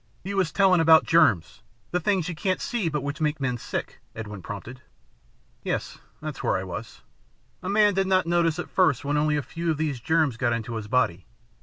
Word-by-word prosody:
"You 200 +2 -4
was 185 -5 +1
telling 190 -3 +4
about 160 0 +6
germs, 100 - +3 0.3
the 180 - +1
things 185 -1 0
you 180 - -3
can't 185 +3 -1
see 225 -9 -1
but 150 -3 -2
which 145 +2 -4
make 150 -1 0
men 125 -3 -1
sick," - - -5 0.2
Edwin 105 -3 -7
prompted. 110 +7 -8 0.8
"Yes, - - -3 0.2
that's 155 -3 -6
where - - +1
I 95 - -4
was. 105 +5 -7 0.6
A - - -4
man 205 0 +4
did 190 0 +1
not 185 -1 +3
notice 170 -1 +2
at 175 - -4
first 160 -8 +2
when 145 +1 0
only 150 0 +2
a 145 - -2
few 170 +3 -4
of 155 - +1
these 150 -5 -2
germs 155 -2 +1
got 120 -1 +1
into 115 +1 -4
his 110 -2 -5
body. 105 -7 0
155 Hz, 205 wpm, -25 LUFS, 120-175 Hz, 0.8 s, about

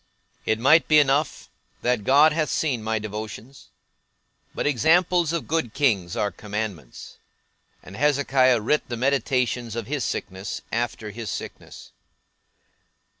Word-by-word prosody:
It 110 - +2
might 140 +8 +4
be 155 - +5
enough, 145 +1 +1 0.3
that 125 -3 +1
God 145 +6 +5
hath 155 -1 0
seen 135 -8 -1
my 110 +1 -1
devotions: 110 +4 -8 0.9
but - - -2
examples 165 +4 +3
of 170 -2 -3
good 155 -8 -1
kings 105 - +1
are 100 - 0
commandments; 105 - -6 0.6
and 95 - -11
Hezekiah 135 -3 +3
writ 150 +7 0
the 120 - -3
meditations 125 -3 0
of 115 -2 -4
his 140 +3 -3
sickness, 95 +1 -5
after 115 -2 -3
his 115 +1 -6
sickness. - - -8
125 Hz, 125 wpm, -24 LUFS, 110-145 Hz, 0.9 s, be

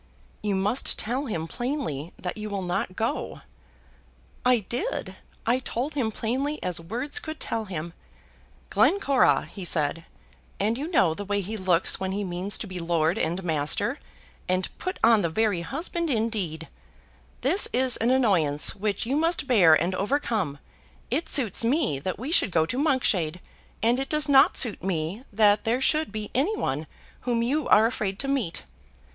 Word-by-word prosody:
"You 205 -2 -1
must 205 +7 0
tell 255 +6 -2
him 165 -7 -3
plainly 240 - -4
that 180 - -5
you 215 0 -5
will 200 -2 -3
not 180 +1 -2
go." 230 +6 -3 1.0
"I 250 -2 +3
did. 245 - -3 0.3
I 245 +3 +2
told 260 +3 -3
him 260 -6 0
plainly 265 +8 -2
as 180 -2 0
words 245 - -1
could 315 -6 -7
tell 225 -1 -3
him. 170 -3 -6 0.8
'Glencora,' 280 -10 +3
he 195 - -9
said, 165 -1 0 0.5
and 215 +3 +1
you 285 +5 -4
know 185 - +3
the 205 - -6
way 205 0 -1
he 200 +3 -4
looks 185 -4 +2
when 190 0 -2
he 205 +1 -2
means 185 +2 -1
to - - -5
be 185 -1 -6
lord 165 0 0
and 175 +4 -2
master, 155 -4 0 0.5
and 185 0 -1
put 370 - -4
on 225 -2 +6
the 170 - 0
very 205 0 0
husband 330 - -3
indeed, 210 - -2 0.7
'This 395 - +5
is 255 -1 +4
an 230 - +1
annoyance 185 - +3
which 205 +1 -2
you 260 +4 -1
must 330 +1 +1
bear 195 -12 +6
and 175 +3 -1
overcome. 205 - -1 0.5
It 320 +5 -1
suits 235 -7 +3
me 240 - +1
that 185 +6 -4
we 260 +7 -5
should 330 - +5
go 160 -3 +2
to 250 - -4
Monkshade, 205 - +1 0.4
and 235 +3 +3
it 270 - -3
does 305 -1 +3
not 275 -1 +5
suit 230 -5 +3
me 185 +5 -3
that 205 0 +3
there 235 +3 +1
should 305 +3 +1
be 215 -1 -5
any 325 - +1
one 150 - -2 0.3
whom 235 -2 -1
you 280 +4 0
are 215 - +6
afraid 205 -4 -2
to 275 - -4
meet.' 255 - -1
215 Hz, 170 wpm, -26 LUFS, 180-260 Hz, 1.0 s, on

